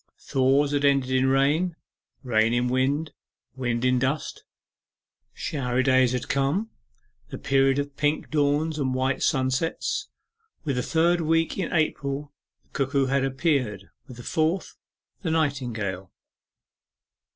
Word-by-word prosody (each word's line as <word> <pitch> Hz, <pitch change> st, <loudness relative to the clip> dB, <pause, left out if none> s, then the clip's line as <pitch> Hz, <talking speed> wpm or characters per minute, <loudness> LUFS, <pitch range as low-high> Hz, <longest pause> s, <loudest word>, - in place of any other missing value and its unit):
Thaws 135 Hz, +2 st, +2 dB
had 145 Hz, -1 st, 0 dB
ended 140 Hz, -2 st, +3 dB
in 130 Hz, 0 st, +3 dB
rain, 145 Hz, +6 st, +2 dB, 0.5 s
rain 115 Hz, -2 st, +2 dB
in 120 Hz, +1 st, +1 dB
wind, 140 Hz, +4 st, 0 dB, 0.4 s
wind 120 Hz, -2 st, -1 dB
in 125 Hz, 0 st, +3 dB
dust. 135 Hz, +4 st, -2 dB, 0.9 s
Showery 130 Hz, -3 st, -1 dB
days 130 Hz, -2 st, +4 dB
had 125 Hz, 0 st, -3 dB
come 140 Hz, +11 st, 0 dB, 0.6 s
the -, -, -6 dB
period 135 Hz, 0 st, +2 dB
of 145 Hz, 0 st, -3 dB
pink 150 Hz, +1 st, -1 dB
dawns 150 Hz, +1 st, +1 dB
and 130 Hz, -2 st, 0 dB
white 130 Hz, +1 st, 0 dB
sunsets; 165 Hz, -, 0 dB, 0.6 s
with 140 Hz, -6 st, -2 dB
the -, -, +1 dB
third 170 Hz, +4 st, +2 dB
week 165 Hz, +1 st, +1 dB
in 185 Hz, -, -2 dB
April 145 Hz, -3 st, -1 dB, 0.3 s
the -, -, -38 dB
cuckoo 135 Hz, 0 st, 0 dB
had 135 Hz, +1 st, +1 dB
appeared, 130 Hz, -, -1 dB, 0.2 s
with 125 Hz, -, -11 dB
the 120 Hz, -, -9 dB
fourth, 160 Hz, +7 st, -1 dB, 0.5 s
the 175 Hz, -, -2 dB
nightingale. 120 Hz, -, -2 dB
135 Hz, 130 wpm, -25 LUFS, 130-155 Hz, 0.9 s, days